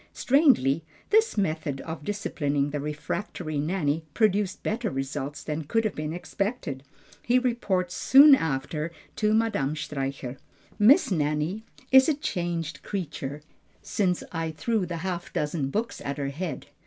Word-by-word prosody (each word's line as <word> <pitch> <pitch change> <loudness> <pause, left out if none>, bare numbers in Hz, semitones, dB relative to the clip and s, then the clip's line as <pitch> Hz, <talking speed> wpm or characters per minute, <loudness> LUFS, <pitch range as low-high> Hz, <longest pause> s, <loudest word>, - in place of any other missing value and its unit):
Strangely, 245 - +3 0.3
this 440 - +4
method 155 -7 -1
of 160 -2 -6
disciplining 145 -7 -1
the 145 - -2
refractory 150 +2 -4
Nanny 160 -1 0
produced 205 -3 +1
better 220 +1 -1
results 135 +1 -4
than 155 0 -3
could 225 +9 +1
have 215 - -1
been 150 0 -4
expected. 180 - -3 0.4
He 245 +1 +3
reports 210 -8 0
soon 280 +7 +8
after 155 - 0 0.3
to 215 0 +2
Madame 185 -11 +1
Streicher, 135 -3 -4 0.4
"Miss 240 - +6
Nanny 155 +6 0 0.3
is 265 +3 +7
a 305 - +2
changed 175 - -3
creature 150 -6 -5 0.4
since 180 -4 0
I 165 -1 -2
threw 200 +4 -1
the 170 0 -4
half 175 -2 -3
dozen 150 -2 -1
books 220 +10 -3
at 140 +1 -3
her 140 -1 -2
head. 160 +1 -5
170 Hz, 140 wpm, -27 LUFS, 145-210 Hz, 0.4 s, soon